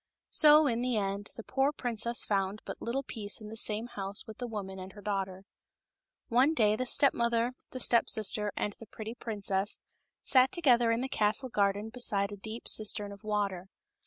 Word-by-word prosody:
So, 305 Hz, 0 st, +7 dB
in 240 Hz, -4 st, 0 dB
the 250 Hz, -2 st, 0 dB
end, 200 Hz, 0 st, -2 dB
the 230 Hz, -, -8 dB
poor 270 Hz, +4 st, +1 dB
princess 235 Hz, -4 st, -1 dB
found 195 Hz, 0 st, -1 dB
but -, -, -7 dB
little 255 Hz, +4 st, -2 dB
peace 210 Hz, -6 st, -3 dB
in 215 Hz, -1 st, -9 dB
the 220 Hz, -, -8 dB
same 220 Hz, 0 st, +2 dB
house 200 Hz, -3 st, 0 dB
with 220 Hz, -, -11 dB
the 245 Hz, -, -4 dB
woman 195 Hz, -4 st, -6 dB
and 185 Hz, 0 st, -9 dB
her 205 Hz, -, -12 dB
daughter. 195 Hz, -2 st, -3 dB, 0.8 s
One 260 Hz, +6 st, +3 dB
day 210 Hz, -4 st, +3 dB
the 255 Hz, +3 st, -3 dB
step 280 Hz, +2 st, +4 dB
mother, 235 Hz, +1 st, +1 dB, 0.2 s
the 255 Hz, -, -7 dB
step 235 Hz, -1 st, +3 dB
sister, 210 Hz, -1 st, +1 dB
and 205 Hz, -, -1 dB
the 225 Hz, -, -11 dB
pretty 220 Hz, +2 st, -7 dB
princess 205 Hz, -4 st, -1 dB, 0.4 s
sat 260 Hz, -1 st, +4 dB
together 245 Hz, -9 st, +3 dB
in 230 Hz, +1 st, 0 dB
the 265 Hz, -, -2 dB
castle 220 Hz, +3 st, 0 dB
garden 205 Hz, 0 st, 0 dB
beside 210 Hz, -4 st, 0 dB
a -, -, -5 dB
deep 220 Hz, +3 st, -7 dB
cistern 210 Hz, -1 st, +2 dB
of 200 Hz, +1 st, -12 dB
water. 200 Hz, -4 st, -2 dB
220 Hz, 190 wpm, -30 LUFS, 205-240 Hz, 0.8 s, So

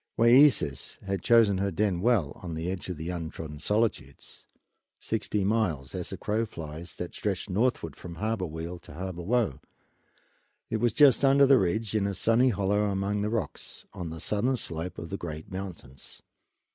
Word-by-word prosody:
Wayeeses 120 Hz, -, +4 dB
had 95 Hz, -2 st, -2 dB
chosen 110 Hz, -4 st, +4 dB
her 100 Hz, 0 st, +1 dB
den 95 Hz, -1 st, 0 dB
well, 105 Hz, -10 st, +2 dB
on 85 Hz, -3 st, -5 dB
the 80 Hz, +3 st, -2 dB
edge 95 Hz, 0 st, -5 dB
of 90 Hz, -, -4 dB
the 80 Hz, +3 st, -4 dB
untrodden 80 Hz, -3 st, -6 dB
solitudes 105 Hz, -7 st, -2 dB, 0.5 s
sixty 105 Hz, -2 st, -1 dB
miles 95 Hz, -10 st, 0 dB
as -, -, -3 dB
the -, -, -5 dB
crow 110 Hz, +2 st, -1 dB
flies 80 Hz, -1 st, -7 dB
that 90 Hz, -, -6 dB
stretch 100 Hz, -2 st, -2 dB
northward 95 Hz, -, 0 dB
from 85 Hz, -1 st, -9 dB
Harbor 105 Hz, 0 st, -2 dB
Weal 80 Hz, +3 st, -6 dB
to 70 Hz, -, -13 dB
Harbor 90 Hz, 0 st, -5 dB
Woe. 105 Hz, -, 0 dB, 1.1 s
It 110 Hz, -, +1 dB
was 120 Hz, 0 st, +1 dB
just 140 Hz, -1 st, +5 dB
under 140 Hz, +1 st, +6 dB
the 135 Hz, -1 st, +6 dB
ridge, 105 Hz, +4 st, -1 dB
in 105 Hz, -2 st, +1 dB
a 100 Hz, -, -3 dB
sunny 115 Hz, +6 st, +3 dB
hollow 105 Hz, -1 st, +1 dB
among 100 Hz, +1 st, -1 dB
the 105 Hz, -, 0 dB
rocks, 115 Hz, -2 st, -4 dB
on 85 Hz, -2 st, -5 dB
the 80 Hz, 0 st, -7 dB
southern 115 Hz, +9 st, 0 dB
slope 85 Hz, -5 st, -5 dB
of 85 Hz, -, -7 dB
the 95 Hz, -, -2 dB
great 80 Hz, -2 st, -7 dB
mountains. 85 Hz, -9 st, -8 dB
95 Hz, 175 wpm, -28 LUFS, 85-110 Hz, 1.1 s, under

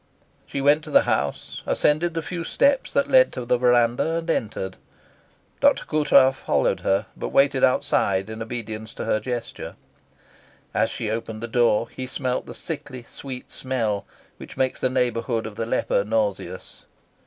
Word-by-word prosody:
She 140 Hz, -, -3 dB
went 145 Hz, +3 st, +4 dB
to -, -, -8 dB
the -, -, +5 dB
house, -, -, -2 dB
ascended 165 Hz, +3 st, +2 dB
the 165 Hz, -, -2 dB
few 170 Hz, +4 st, -4 dB
steps 275 Hz, +9 st, +2 dB
that 280 Hz, 0 st, +1 dB
led 260 Hz, -2 st, +5 dB
to 125 Hz, -, -5 dB
the 125 Hz, 0 st, +2 dB
verandah, 125 Hz, +6 st, +3 dB
and 165 Hz, 0 st, -4 dB
entered. 95 Hz, -7 st, -3 dB, 0.8 s
Dr. -, -, +3 dB
Coutras 140 Hz, -3 st, +4 dB
followed -, -, +1 dB
her, 95 Hz, +2 st, +1 dB
but -, -, -4 dB
waited 135 Hz, -1 st, +3 dB
outside 100 Hz, -6 st, +2 dB
in 110 Hz, +1 st, -7 dB
obedience 110 Hz, -1 st, -6 dB
to -, -, -5 dB
her 110 Hz, -, +1 dB
gesture. 120 Hz, +1 st, -5 dB, 1.0 s
As -, -, +2 dB
she 110 Hz, -, -3 dB
opened 110 Hz, 0 st, -4 dB
the -, -, -2 dB
door 115 Hz, -1 st, +2 dB
he 130 Hz, +2 st, -7 dB
smelt 130 Hz, -1 st, -2 dB
the -, -, -8 dB
sickly 130 Hz, -6 st, -6 dB
sweet 130 Hz, -2 st, -8 dB
smell 115 Hz, -6 st, -2 dB, 0.3 s
which -, -, -11 dB
makes 130 Hz, -1 st, 0 dB
the 130 Hz, -, +2 dB
neighbourhood 120 Hz, -2 st, 0 dB
of 110 Hz, -, -6 dB
the 115 Hz, +2 st, -4 dB
leper 100 Hz, -, +1 dB
nauseous. 105 Hz, -4 st, -3 dB
125 Hz, 165 wpm, -24 LUFS, 110-140 Hz, 1.0 s, the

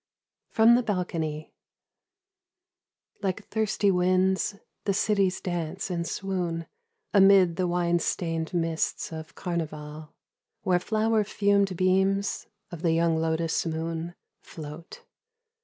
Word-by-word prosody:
From 225 Hz, +1 st, +5 dB
the 245 Hz, -, +4 dB
Balcony. 165 Hz, -7 st, -3 dB, 1.7 s
Like 195 Hz, +1 st, -2 dB
thirsty 215 Hz, -2 st, +1 dB
winds 185 Hz, +2 st, +2 dB, 0.3 s
the 200 Hz, -2 st, +1 dB
cities 200 Hz, -3 st, +1 dB
dance 175 Hz, +1 st, -3 dB
and 170 Hz, -1 st, -2 dB
swoon 180 Hz, -4 st, -3 dB, 0.5 s
Amid 195 Hz, -4 st, +6 dB
the 185 Hz, 0 st, 0 dB
wine 175 Hz, 0 st, +1 dB
stained 165 Hz, -2 st, -2 dB
mists 165 Hz, -2 st, -1 dB
of 160 Hz, 0 st, -8 dB
Carnival, 155 Hz, -2 st, -5 dB, 0.5 s
Where 180 Hz, -1 st, +3 dB
flower 220 Hz, +2 st, +1 dB
fumed 200 Hz, -2 st, +1 dB
beams 190 Hz, +2 st, +1 dB, 0.2 s
of 170 Hz, -3 st, -7 dB
the 165 Hz, -2 st, +2 dB
young 165 Hz, 0 st, +2 dB
lotus 160 Hz, 0 st, 0 dB
moon 165 Hz, +1 st, -3 dB, 0.3 s
Float. 155 Hz, +1 st, -10 dB
180 Hz, 105 wpm, -27 LUFS, 165-195 Hz, 1.7 s, Amid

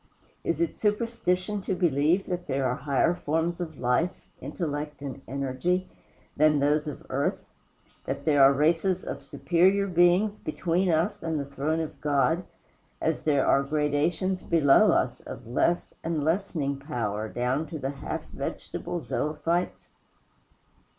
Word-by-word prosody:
Is -, -, -1 dB
it 335 Hz, -, 0 dB
superstition 210 Hz, -3 st, 0 dB
to 190 Hz, -, -2 dB
believe 170 Hz, +1 st, +2 dB
that 180 Hz, -1 st, -4 dB
there 135 Hz, 0 st, 0 dB
are 125 Hz, -, +1 dB
higher 140 Hz, +5 st, +1 dB
forms 170 Hz, +2 st, -1 dB
of 160 Hz, -4 st, -5 dB
life, 125 Hz, +8 st, +2 dB, 0.3 s
intellect, 150 Hz, -2 st, -4 dB
and 135 Hz, -1 st, -6 dB
energy 140 Hz, +7 st, -1 dB, 0.5 s
than 150 Hz, 0 st, +4 dB
those 150 Hz, +2 st, +2 dB
of 150 Hz, -, -7 dB
earth; 140 Hz, +2 st, 0 dB, 0.7 s
that -, -, -4 dB
there 145 Hz, -3 st, +4 dB
are 135 Hz, -, +8 dB
races 165 Hz, +6 st, +2 dB
of -, -, -5 dB
superior 190 Hz, +4 st, +2 dB
beings 180 Hz, +3 st, +3 dB
between 175 Hz, +4 st, 0 dB
us 170 Hz, +5 st, +1 dB
and 160 Hz, -2 st, -2 dB
the 140 Hz, -, -3 dB
throne 140 Hz, +3 st, -2 dB
of 160 Hz, -, -7 dB
God, 150 Hz, +4 st, +2 dB, 0.6 s
as 160 Hz, -1 st, 0 dB
there 145 Hz, -3 st, +2 dB
are 140 Hz, -, +4 dB
gradations 155 Hz, +6 st, 0 dB
below 150 Hz, -5 st, +5 dB
us -, -, +1 dB
of -, -, -9 dB
less 165 Hz, +9 st, 0 dB
and 165 Hz, -3 st, -1 dB
lessening 160 Hz, -4 st, 0 dB
power 110 Hz, -7 st, -3 dB
down 125 Hz, +7 st, -1 dB
to 160 Hz, -, -6 dB
the 135 Hz, -1 st, -3 dB
half 140 Hz, -, -5 dB
vegetable 175 Hz, -, -4 dB
zoöphytes? 150 Hz, +7 st, -2 dB
155 Hz, 145 wpm, -27 LUFS, 140-175 Hz, 0.7 s, are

